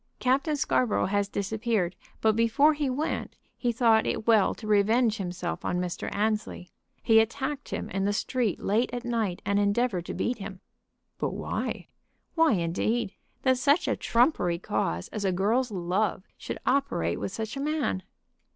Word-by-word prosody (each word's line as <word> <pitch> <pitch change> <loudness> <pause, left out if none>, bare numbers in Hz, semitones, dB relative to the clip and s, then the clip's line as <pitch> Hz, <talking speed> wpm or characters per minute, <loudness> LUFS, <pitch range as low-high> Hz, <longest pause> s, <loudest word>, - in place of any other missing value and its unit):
Captain 275 +4 +1
Scarborough 255 -4 +1
has 200 +1 0
disappeared, 205 -2 -1 0.3
but 220 -1 +3
before 230 +7 +4
he 295 -2 -1
went 285 +5 -2 0.2
he 245 - 0
thought 225 -2 +3
it - - -2
well 220 -4 +4
to - - -10
revenge 215 +2 +3
himself 180 -3 -4
on 180 - -1
Mr. 180 -1 -3
Annesley. 210 -3 -2 0.3
He 225 -1 +6
attacked 270 +5 -1
him - - -3
in 195 0 -1
the 205 - +2
street 225 -1 -1
late 220 +5 +1
at 245 0 -4
night, 225 -7 -1
and 200 +1 +2
endeavored 205 -2 +1
to - - -4
beat 240 -1 -1
him." 195 -1 -7 0.6
"But - - -2
why?" - - -3 0.5
"Why 325 -5 +4
indeed. 195 +5 0 0.3
That 260 -1 +3
such 285 +6 +3
a - - +1
trumpery 235 - +2
cause 95 - -2
as 210 - -4
a 190 - +2
girl's 220 +8 +1
love 185 +1 -1
should - - -6
operate 95 - +1
with - - -3
such 220 +4 -4
a - - -4
man!" 290 -10 -1
220 Hz, 165 wpm, -27 LUFS, 195-250 Hz, 0.6 s, He